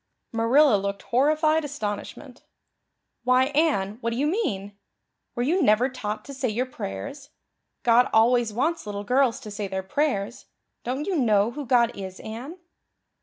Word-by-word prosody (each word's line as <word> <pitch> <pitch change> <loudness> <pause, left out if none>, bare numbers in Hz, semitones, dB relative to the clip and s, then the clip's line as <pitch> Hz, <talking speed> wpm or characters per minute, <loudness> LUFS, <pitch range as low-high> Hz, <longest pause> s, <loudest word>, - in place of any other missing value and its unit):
Marilla 230 +2 +4
looked 200 0 -4
horrified 310 +5 +2
astonishment. 220 -8 -6 0.8
"Why, 255 +1 +4
Anne, 235 -10 +1
what 230 - -1
do 230 - -3
you 280 - +1
mean? 205 - -2 0.6
Were 240 - -1
you 340 +8 +1
never 245 0 +4
taught 215 -4 -5
to 280 - -8
say 260 -2 -2
your 235 +4 -1
prayers? 255 - -7 0.5
God 240 0 +4
always 235 +1 +3
wants 290 +4 -1
little 205 0 -4
girls 250 +2 +2
to 215 -4 -9
say 205 0 -4
their 190 0 -4
prayers. 230 -1 -2 0.4
Don't 265 +5 -3
you 390 - -1
know 215 -3 +3
who 285 0 -7
God 240 -1 +3
is, 190 -1 -7
Anne?" 245 +10 -7
240 Hz, 155 wpm, -25 LUFS, 210-280 Hz, 0.8 s, Marilla